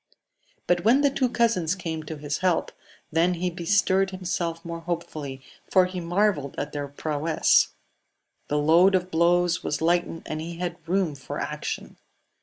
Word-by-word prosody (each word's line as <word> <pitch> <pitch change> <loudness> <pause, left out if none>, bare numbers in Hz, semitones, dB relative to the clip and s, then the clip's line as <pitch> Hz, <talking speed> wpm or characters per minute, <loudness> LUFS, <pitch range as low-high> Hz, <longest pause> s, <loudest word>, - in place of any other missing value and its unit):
But 175 -1 +1
when 240 +7 +5
the 285 -1 +3
two 260 -2 +1
cousins 225 -8 +1
came 165 -4 -4
to 155 0 -6
his 145 0 -3
help, 185 -3 +1 0.4
then 170 +3 +2
he 180 +1 -2
bestirred 190 +2 +2
himself 175 -3 -3
more 170 0 -5
hopefully, 155 -5 -5 0.3
for 185 -1 +5
he 180 0 -5
marvelled 175 -5 0
at 145 +1 -3
their 145 -1 -4
prowess. 155 +2 +2 0.7
The 150 - 0
load 170 +6 +5
of 180 0 -1
blows 175 +1 +2
was 145 - -1
lightened, 170 0 0
and 155 0 -4
he 165 +1 -6
had 175 -1 -3
room 185 -4 +1
for 135 -2 -7
action. - - -5
170 Hz, 160 wpm, -25 LUFS, 160-185 Hz, 0.7 s, when